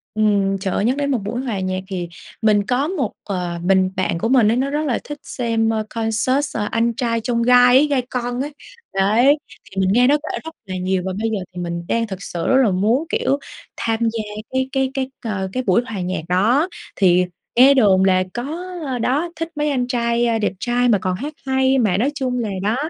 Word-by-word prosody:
Ừm, 200 -2 +2
trời 190 -1 -3
ơi, 205 - 0
nhắc 255 +4 +1
đến 285 -1 0
một 260 - +2
buổi 235 +5 -3
hòa 235 -7 -3
nhạc 185 0 -2
thì 180 -3 -4 0.3
mình 210 -2 +3
có 255 +6 0
một, 300 - -2
ờ, 180 -3 -3
mình 190 0 +3
bạn 185 -2 0
của 225 - -1
mình 245 -4 +5
ấy 235 - +1
nó 270 +2 0
rất 300 +2 -1
là 255 -5 0
thích 295 - -7
xem, 230 -2 -1
ơ, 220 -1 0
concert 230 +6 -1
Anh 230 +1 +1
Trai 230 -2 0
Chông 235 0 0
Gai 245 +1 +6
ấy, 285 - +5
Gai 280 -3 +1
Con 245 0 -2
ấy. 290 +2 -4 0.4
Đấy, 220 +9 +4 0.3
thì 195 - -4
mình 185 - +2
nghe 245 +2 +5
nó 290 +2 +4
kể 300 +1 -5
rất 320 0 -9
là 190 -1 -5
nhiều, 185 0 -1
và 190 - -2
bây 225 - 0
giờ 220 - -1 0.2
thì 180 - -4
mình 170 0 -4
đang 230 0 0
thực 195 -1 -7
sự 170 -1 -4
rất 260 - +4
là 220 - +3
muốn, 220 - +1
kiểu, 280 - 0 0.4
tham 225 0 -1
gia 225 -1 0 0.3
cái 260 0 -1
cái 265 -1 +1
cái, 265 -1 -2 0.2
ờ, 195 -4 -2
cái 255 - -1
buổi 195 +1 +3
hòa 215 -6 -5
nhạc 180 -1 -2
đó. 225 - +3 0.3
Thì 180 -2 +4 0.3
nghe 260 +3 +7
đồn 200 -8 +4
là 185 -1 +3
có 280 +8 -4 0.4
đó 290 +9 0
thích 330 +1 -4
mấy 295 0 0
anh 250 -3 0
trai, 235 -1 +1
ơ, 230 -1 +1
đẹp 210 - 0
trai 245 +2 +1
mà 215 - +5
còn 185 -1 -2
hát 285 +10 -5
hay. 265 0 +2
Mà 210 -8 +2
nói 255 +8 +1
chung 255 -3 -1
là 225 -3 -2
đó, 215 +3 +1
230 Hz, 230 wpm, -20 LUFS, 195-260 Hz, 0.4 s, nghe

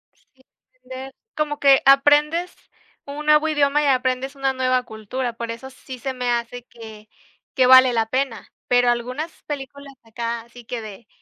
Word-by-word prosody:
Sí, - - -35 0.5
entender. 260 +1 -10 0.2
Como 295 -1 -2
que 275 -1 +5
aprendes 295 +5 +4 0.5
un 290 +2 -7
nuevo 305 +1 +4
idioma 295 -1 +2
y 290 - +1
aprendes 260 +1 0
una 270 -1 -1
nueva 255 -1 0
cultura, 235 +3 -5
por 230 0 -5
eso 235 +3 -8
sí 260 -1 -11
se 265 +1 -4
me 250 -1 -3
hace 240 +1 -3
que 220 -3 -13 0.5
que 255 -1 +4
vale 260 -1 +7
la 225 -1 0
pena, 260 -4 -3 0.2
pero 245 0 +3
algunas 250 +7 -2
películas 280 -1 -8
acá 230 +1 -5
así 235 0 -16
que 240 -1 -5
de 215 +1 -11
255 Hz, 165 wpm, -21 LUFS, 235-280 Hz, 0.5 s, vale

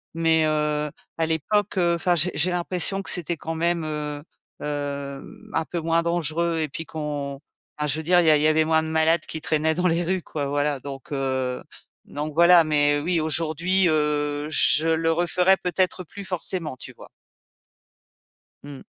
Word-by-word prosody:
Mais, 165 -1 +3
heu, 150 -1 0 0.3
à 165 - +2
l'époque, 195 +6 0
heu, 170 -1 +3
enfin 175 +1 +1
j'ai 175 +2 +2
j'ai 170 +4 +1
l'impression 180 +2 -1
que - - -3
c'était 170 -2 -1
quand 165 +2 -5
même, 170 0 0
heu 150 -1 -4 0.4
heu, 140 -1 -4
mmh, - - -14
un 160 - 0
peu 175 - -4
moins 165 +1 +1
dangereux 170 0 0
et 155 - 0
puis 165 +4 -7
qu'on 145 -3 -5 0.4
enfin 150 - 0
je 150 - +1
veux 160 - -4
dire, 180 +2 +4
il 175 - +3
y - - +7
a 150 - +6
il - - -1
y - - +5
avait 155 0 +3
moins 160 0 +2
de - - -4
malades 160 +1 +2
qui 160 - -3
traînaient 160 0 +1
dans 180 +2 +1
les 170 +1 +1
rues, 185 +1 -1
quoi. 145 -2 -4
Voilà 145 0 -1
donc, 140 +2 -9
heu, 130 -2 -2 0.4
donc 150 +1 -5
voilà, 170 +1 +6
mais, 145 -1 +2
heu, - - -4
oui, 175 +1 +1
aujourd'hui, 165 +4 +1
heu, 150 -1 0
je 155 +1 +3
le 165 0 +2
referais 180 +3 +2
peut-être 185 +1 -1
plus 200 +4 -10
forcément, 180 -4 0
tu - - -10
vois? - - -14 1.6
Mmh. 145 -2 -9
160 Hz, 195 wpm, -24 LUFS, 150-170 Hz, 1.6 s, y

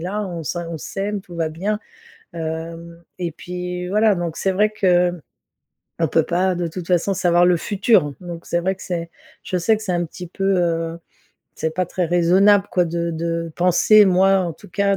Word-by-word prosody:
là 205 +5 -3
on 170 -3 -5
sa 170 +3 -3
on 160 - -5
s'aime, 200 +5 -4
tout 175 -2 -13
va 165 -1 0
bien, 200 +7 -2 0.6
hem 165 +1 -6 0.2
et 170 -3 -3
puis, 180 +1 -5
voilà, 210 +1 +3
donc 170 -2 -3
c'est 195 - 0
vrai 210 +3 +2
que 180 -4 +3
m 175 -3 -10 0.8
on 165 - +2
peut 160 +2 +2
pas 185 +1 0
de 175 0 -2
toute 170 +1 -7
façon 180 +2 +2
savoir 175 -1 +3
le 175 -1 +4
futur. 190 -5 +2
Donc 170 -1 -8
c'est 170 - 0
vrai 190 +2 0
que 185 - -16
c'est 170 -2 -4 0.3
je 185 - -2
sais 220 +6 +3
que 215 - -9
c'est 190 - -2
un 175 0 0
petit 180 +2 -9
peu, 195 +2 0
heu, 165 -1 -1 0.6
c'est 160 0 -2
pas 185 -1 0
très 180 0 -2
raisonnable 190 +4 +4
quoi 180 -1 +3
de 170 0 -2
de 165 0 -3
penser 185 +4 +5
moi 190 +1 +4
en 175 -2 -2
tout - - -16
cas 200 +1 +1
175 Hz, 205 wpm, -21 LUFS, 170-190 Hz, 0.8 s, penser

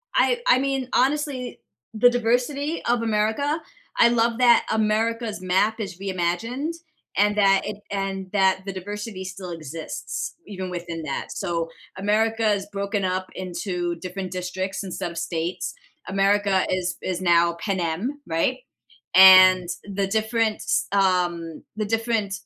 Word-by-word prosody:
I 485 -1 +3
I 260 - +6
mean, 270 -2 -1
honestly, 270 -1 0 0.3
the 235 +3 +5
diversity 250 +6 0
of 240 -1 +2
America, 225 +8 0 0.4
I 235 - +7
love 235 0 +1
that 240 -2 +5
America's 220 0 0
map 200 +5 +1
is 190 -4 -5
reimagined, 195 - -2 0.4
and 205 +1 +3
that 195 -1 +5
it 210 -1 -4
and 195 -1 -3
that 190 -1 +3
the 195 - -4
diversity 205 +1 -6
still 185 -1 -7
exists, 160 -1 -6
even 190 -2 -5
within 170 -2 -5
that, 140 -2 -4
so 170 -3 -2 0.3
America's 210 0 +1
broken 200 0 -2
up 185 0 -2
into 175 -1 -3
different 185 +1 -6
districts 185 +2 -3
and 185 -2 -6
sub-states, 170 0 -3 0.3
America 195 0 +2
is 180 -1 -1
is 185 -1 -2
now 170 -1 +3
Panem, 195 - -2
right? 165 +11 0 0.6
And, 185 -1 +8 0.2
the 200 -1 -2
different, 220 +1 0
s - - 0
um, 175 -4 0
the 215 - -1
different 225 -1 -1
195 Hz, 130 wpm, -24 LUFS, 185-225 Hz, 0.6 s, And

